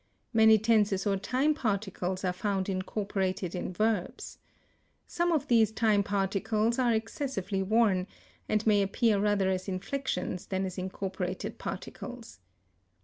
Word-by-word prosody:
Many 220 -1 +7
tenses 210 -3 +2
or 200 -1 +2
time 255 +10 +1
particles 195 - -2
are 180 - +1
found 195 0 -1
incorporated 190 -1 -2
in 180 - -3
verbs. 210 -1 -2 0.7
Some 345 0 0
of 310 -5 0
these 225 -3 +4
time 220 -2 +2
particles 205 +4 0
are 245 -2 +3
excessively 220 -3 -2
worn, 195 -2 +2 0.4
and 215 0 +1
may 210 -2 +4
appear 200 +2 +2
rather 205 -2 +2
as 185 +1 -2
inflections 185 -2 -3
than 190 0 -1
as 185 0 -5
incorporated 185 0 -4
particles. 245 - -7
205 Hz, 130 wpm, -29 LUFS, 190-225 Hz, 0.7 s, Many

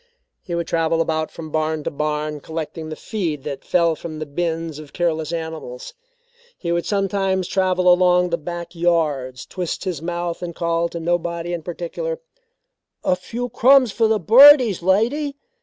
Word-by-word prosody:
He 175 - -5
would 170 0 -1
travel 165 0 0
about 160 -1 0
from 160 -2 -9
barn 155 0 -1
to - - -2
barn 150 0 -2
collecting 160 +1 -6
the 155 - -5
feed 165 -11 -3
that 140 -2 -5
fell 170 -2 +2
from 155 0 -7
the 155 - -4
bins 165 0 -3
of 150 -2 -12
careless 160 -3 -1
animals. 320 - -6 0.6
He 170 - -3
would 170 0 -1
sometimes 195 -2 0
travel 185 -1 +1
along 180 0 +4
the 170 - +1
back 175 +2 -6
yards, 155 -7 0
twist 180 -3 -4
his 175 -6 -3
mouth 175 0 -3
and 170 -2 -5
call 170 0 0
to 170 - -6
nobody 170 0 -2
in 170 - -3
particular: 175 - -4 0.8
"A 180 - +2
few 235 +7 -5
crumbs 255 0 +5
for 225 +2 +2
the 220 -1 +2
birdies, 245 - +7
lady?" 240 - +1
170 Hz, 165 wpm, -21 LUFS, 160-190 Hz, 0.8 s, birdies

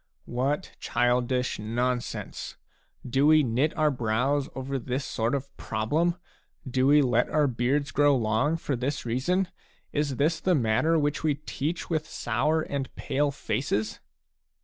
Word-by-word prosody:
What 135 +8 -1
childish 125 0 +1
non 120 +4 0
sense! - - -7 0.5
Do 135 +4 +3
we 155 0 +6
knit 130 +5 +1
our 155 -1 +3
brows 125 +4 0
over 135 +1 -3
this 130 +3 -3
sort 115 +4 -1
of 140 0 -5
problem? 150 +11 0 0.5
Do 130 +1 +2
we 145 +1 +6
let 125 -1 +2
our 150 -1 +3
beards 135 +3 0
grow 145 0 +4
long 120 +8 +1
for 145 -4 -2
this 130 +3 -3
reason? 175 +11 0 0.4
Is 145 -2 0
this 155 +5 +1
the 185 0 +2
matter 135 +6 +2
which 145 -1 0
we 155 -2 +2
teach 150 +3 -4
with 155 -1 0
sour 150 +7 0
and 140 -3 -3
pale 145 +1 0
faces 130 -6 -2
135 Hz, 150 wpm, -27 LUFS, 125-150 Hz, 0.5 s, we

